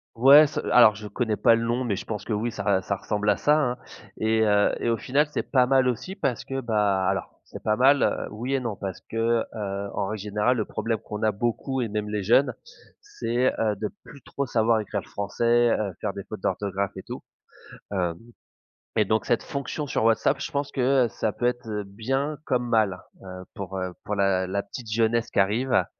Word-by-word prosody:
Ouais, 140 +6 +8
ce 145 - -4
alors 115 -4 +7
je 105 +1 -8
connais 110 +1 -1
pas 115 +1 +5
le 115 0 -1
nom, 120 +2 0
mais 105 -6 -1
je - - -6
pense 105 -2 -4
que - - -7
oui 110 +3 0
ça 115 - -6 0.2
re - - -11
ça 100 - 0
ressemble 105 +2 -2
à 105 - +4
ça, 150 - +2
hein. 125 -5 0 0.4
Et 110 0 +2
heu, 105 -1 +3
et - - -1
au 115 - +2
final 135 +7 +1
c'est - - -1
pas 130 -2 +3
mal 130 0 +3
aussi 125 - -4
parce 135 - -2
que 135 0 -3
bah 105 -5 +1
alors - - -2
c'est - - -11
pas 110 - +1
mal 135 +4 +5
heu, - - 0
oui 120 +6 -4
et 135 - 0
non 115 -5 -4
parce 95 -2 -6
que 115 - -8 0.4
heu, 100 -2 -4
en 100 - -1
règle 110 0 -4
générale 105 +4 +1
le 110 - 0
problème 115 +1 -3
qu'on 105 +1 -7
a 110 -1 +2
beaucoup 120 +5 -2
et 115 - -2
même 105 0 -3
les 105 -1 -2
jeunes, 125 +6 +4 0.5
c'est 120 +3 -1
heu, 110 -2 +1
de 105 +1 -3 0.2
plus 140 -3 -13
trop 140 - -4
savoir 115 -2 +2
écrire 105 -1 -3
le - - -18
français 115 +4 +1
heu, 105 -2 -2
faire 100 - -3
des 100 - -7
fautes 105 +1 -8
d'orthographe 100 +1 -2
et 95 - -8
tout. - - -7 0.7
Hem, 90 -4 -1 0.8
et - - +4
donc - - 0
cette - - +1
fonction 140 +2 -4
sur 130 - -1
WhatsApp, 115 +5 +3
je - - -4
pense 140 0 -2
que 130 -1 +3
heu, - - 0
ça 110 -1 -2
peut 120 - -4
être 120 -1 0
heu, 105 -1 -3
bien 135 +9 -2
comme 125 -1 0
mal 110 -6 +2 0.2
heu, 95 -1 -8
pour, 95 -3 -6
heu, 90 -1 -3
pour 105 - -3
la 95 -2 +1
la 100 +2 -1
petite 110 +2 -9
jeunesse 115 +1 +1
qui - - 0
arrive. 105 0 +2
110 Hz, 230 wpm, -25 LUFS, 100-125 Hz, 0.8 s, Ouais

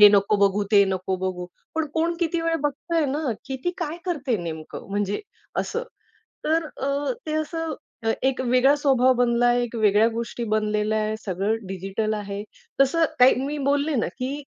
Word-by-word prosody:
हे 210 - +12
नको 200 +1 +4
बघू, 200 0 +3
ते 200 -1 +7
नको 190 0 -1
बघू. 185 -1 -3 0.3
पण 320 -1 0
कोण 335 +1 +1
किती 340 0 +1
वेळ 330 0 0
बघतंय 320 +3 0
ना 280 -1 -1
की 265 -1 -3
ती 355 - +2
काय 335 -1 -3
करते 285 -9 -1
नेमकं? 160 -2 -6
म्हणजे 205 0 -1 0.4
असं. 470 - -3 0.6
तर 320 +1 +2
अ, 280 - -2
ते 310 - -3
असं 320 0 -2 0.3
अ, 225 - +3
एक 265 -1 +1
वेगळा 255 +3 +5
स्वभाव 260 -3 +4
बनला 245 -1 +2
आहे, 245 0 +3
एक 240 0 -5
वेगळ्या 215 0 +4
गोष्टी 235 +1 -4
बनलेल्या 215 0 +1
आहे 215 0 -1
सगळं 195 +3 0
डिजिटल 195 +3 -2
आहेत. 205 0 -4 0.4
तसं 325 +5 +4
काही 250 +1 +7
मी 295 +1 -3
बोलले 285 +1 +1
ना - - -1
की 275 +3 -3
245 Hz, 175 wpm, -24 LUFS, 205-295 Hz, 0.6 s, हे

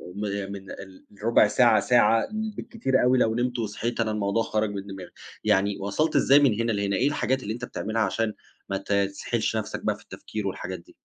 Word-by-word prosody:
م 105 - -5 0.3
من 95 -1 -8
ال 95 -1 -11 0.2
ربع 115 -2 +5
ساعة، 120 +3 +4
ساعة 115 -2 +3 0.3
بالكتير 135 - 0
أوي، 125 +1 +4
لو 110 -2 +2
نمت 120 0 -1
وصحيت 115 +2 -3
أنا 110 -1 +1
الموضوع 105 +1 0
خرج 110 -1 0
من 100 0 -6
دماغي، 95 -2 -8 0.3
يعني 100 -1 +2
وصَلت 145 +11 -1
إزاي 140 +1 +6
من 120 -7 +3
هنا 115 0 0
لهنا؟ 100 -1 0
إيه 130 +8 +2
الحاجات 130 -2 0
اللي 105 +2 -3
أنت 125 +1 -5
بتعملها 110 0 -3
عشان 110 +2 0 0.4
ما 100 - 0
ت 100 - -8
تسحلش 100 0 0
نفسك - - -4
بقى - - +1
في - - -17
التفكير 105 -2 -6
والحاجات 95 -1 -5
دي؟ 85 - -20
110 Hz, 200 wpm, -26 LUFS, 100-120 Hz, 0.4 s, إزاي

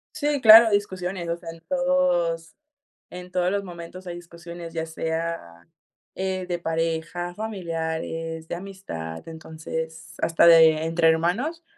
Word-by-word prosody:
Sí, 295 -2 0
claro, 225 0 +10
hay 205 - +1
discusiones, 185 -3 -2
o 170 - -1
sea, 170 -1 -9
en 165 0 -12
todos 265 -13 +1 0.6
en 180 0 -9
todos 180 0 +1
los 200 0 -1
momentos 175 +1 -10
hay 175 -1 -5
discusiones, 170 -1 -10
ya 160 - -2
sea, 160 - -4 0.5
eh, 190 -1 -2
de 175 -1 -1
pareja, 165 +1 -2
familiares, 165 -5 -4
de - - -3
amistad, 175 - -7
entonces, 160 0 -7
hasta 165 0 +3
de 160 -2 +7
entre 165 0 +3
hermanos, 210 - 0
170 Hz, 140 wpm, -24 LUFS, 165-190 Hz, 0.6 s, claro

